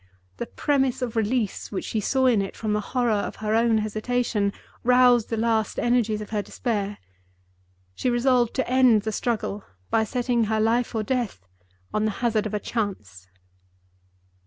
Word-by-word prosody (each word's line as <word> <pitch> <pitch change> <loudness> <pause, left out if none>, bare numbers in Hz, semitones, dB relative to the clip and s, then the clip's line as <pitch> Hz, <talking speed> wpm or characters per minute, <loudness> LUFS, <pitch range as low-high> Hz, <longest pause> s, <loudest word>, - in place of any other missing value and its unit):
The - - -4
promise 265 - 0
of 240 -2 -4
release 225 -1 -1
which 195 - -3
she 220 - -2
saw 260 +5 +1
in 235 -5 +4
it 195 - -5
from 215 -2 -1
the 210 - +1
horror 245 +2 0
of 205 -1 -1
her 215 0 -2
own 230 0 +3
hesitation 215 -1 0 0.3
roused 250 -2 +4
the 225 - -2
last 220 -1 0
energies 235 -3 +1
of 210 - -8
her 210 -2 0
despair. 205 -2 -3 1.0
She 250 - -1
resolved 245 -1 +2
to 260 - 0
end 250 -4 +4
the 220 - -2
struggle 210 -3 -2 0.3
by 220 - +3
setting 240 0 0
her 220 +1 0
life 230 +2 +1
or 220 - 0
death 225 - -2 0.5
on 215 0 +1
the 215 - +1
hazard 220 -3 +1
of 215 - -4
a - - 0
chance. 105 - -4
225 Hz, 170 wpm, -25 LUFS, 210-245 Hz, 1.0 s, in